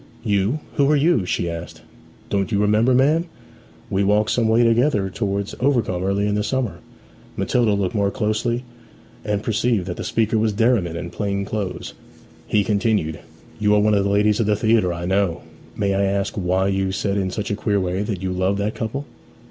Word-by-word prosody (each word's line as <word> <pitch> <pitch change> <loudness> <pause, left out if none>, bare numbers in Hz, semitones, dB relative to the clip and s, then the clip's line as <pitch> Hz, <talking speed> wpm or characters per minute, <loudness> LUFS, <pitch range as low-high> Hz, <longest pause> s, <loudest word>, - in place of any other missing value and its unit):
'You 105 +6 0 0.2
who 140 -1 +4
are 150 - +4
you?' 145 - +2
she 85 - -1
asked. 85 -1 -7 0.5
'Don't 100 +2 0
you 100 - +1
remember, 105 +5 +3
ma'am? 150 +6 +3 0.7
We 100 0 +1
walked 105 +2 +2
some 115 -2 +2
way 115 +2 +4
together 115 -4 +2
towards 100 -1 -2
Overcombe 120 -9 +1
earlier 100 +1 0
in 105 - 0
the 105 0 0
summer.' 130 -1 -2 0.6
Matilda 110 +2 +2
looked 95 -2 -1
more 100 -2 +1
closely, 115 +2 -1 0.6
and 105 -1 -2
perceived 110 -3 0
that 90 -1 -5
the - - -4
speaker 110 0 +1
was 110 -1 +1
Derriman, 110 -6 +1
in 85 0 -6
plain 100 0 -2
clothes. 100 -2 -4 0.5
He 105 - +2
continued, 100 -7 0 0.4
'You 105 0 +3
are - - +4
one 105 +1 +3
of 100 -1 +3
the 100 - 0
ladies 105 +2 +2
of 110 - +1
the 105 - +3
theatre, 110 -3 +2
I 85 0 -4
know. 95 -2 0 0.3
May 100 -2 +1
I 100 - +1
ask 100 0 -1
why 95 0 0
you 95 -1 0
said 100 +1 -1
in 95 -2 0
such 105 +2 -4
a - - +1
queer 100 -1 0
way 95 +1 -1
that 100 -3 -3
you 95 - -1
loved 95 +2 0
that 105 +1 -1
couple?' 135 +6 -4
105 Hz, 195 wpm, -21 LUFS, 95-110 Hz, 0.7 s, who